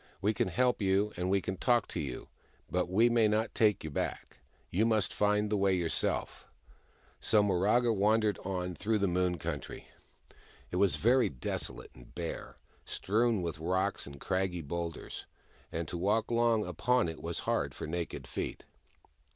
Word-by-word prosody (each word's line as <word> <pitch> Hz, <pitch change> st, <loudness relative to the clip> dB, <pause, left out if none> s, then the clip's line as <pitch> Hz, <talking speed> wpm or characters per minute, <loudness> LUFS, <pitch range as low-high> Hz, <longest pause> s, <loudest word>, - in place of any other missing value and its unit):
" -, -, -32 dB
We 105 Hz, +2 st, +3 dB
can 100 Hz, -, 0 dB
help 125 Hz, +6 st, +1 dB
you, 100 Hz, +2 st, +2 dB
and 90 Hz, +1 st, -2 dB
we 100 Hz, 0 st, +3 dB
can 95 Hz, 0 st, -4 dB
talk 120 Hz, 0 st, +2 dB
to -, -, -4 dB
you, 70 Hz, -5 st, -5 dB, 0.4 s
but 90 Hz, 0 st, 0 dB
we 110 Hz, +6 st, +4 dB
may 115 Hz, -2 st, +4 dB
not 110 Hz, +2 st, 0 dB
take 105 Hz, -3 st, +3 dB
you 80 Hz, -, -5 dB
back. -, -, -4 dB, 0.3 s
You 100 Hz, +5 st, +2 dB
must 110 Hz, -4 st, +2 dB
find 105 Hz, 0 st, +2 dB
the 105 Hz, -, +2 dB
way 95 Hz, -1 st, +3 dB
yourself." 85 Hz, -3 st, -1 dB, 0.7 s
So 105 Hz, -2 st, +3 dB
Miraga 105 Hz, +5 st, +3 dB
wandered 105 Hz, 0 st, +2 dB
on 90 Hz, -1 st, -3 dB
through 105 Hz, +6 st, 0 dB
the 100 Hz, -1 st, +1 dB
Moon 90 Hz, 0 st, +1 dB
Country. 70 Hz, -, -6 dB, 0.8 s
It 90 Hz, -, -1 dB
was 100 Hz, -1 st, +4 dB
very 125 Hz, +2 st, +4 dB
desolate 65 Hz, -4 st, -5 dB
and -, -, -16 dB
bare, 85 Hz, -2 st, -5 dB, 0.3 s
strewn 110 Hz, -1 st, +1 dB
with 85 Hz, -2 st, -3 dB
rocks 95 Hz, +3 st, 0 dB
and 70 Hz, -1 st, -10 dB
craggy 95 Hz, -1 st, -1 dB
boulders, 85 Hz, +2 st, -5 dB, 0.4 s
and 80 Hz, -1 st, -3 dB
to 85 Hz, -, -4 dB
walk 105 Hz, +6 st, +1 dB
long 115 Hz, -2 st, +3 dB
upon 110 Hz, +6 st, +1 dB
it 80 Hz, -1 st, -6 dB
was 85 Hz, 0 st, -3 dB
hard -, -, -1 dB
for -, -, -5 dB
naked 85 Hz, +2 st, -4 dB
feet. -, -, -4 dB
95 Hz, 170 wpm, -31 LUFS, 90-110 Hz, 0.8 s, we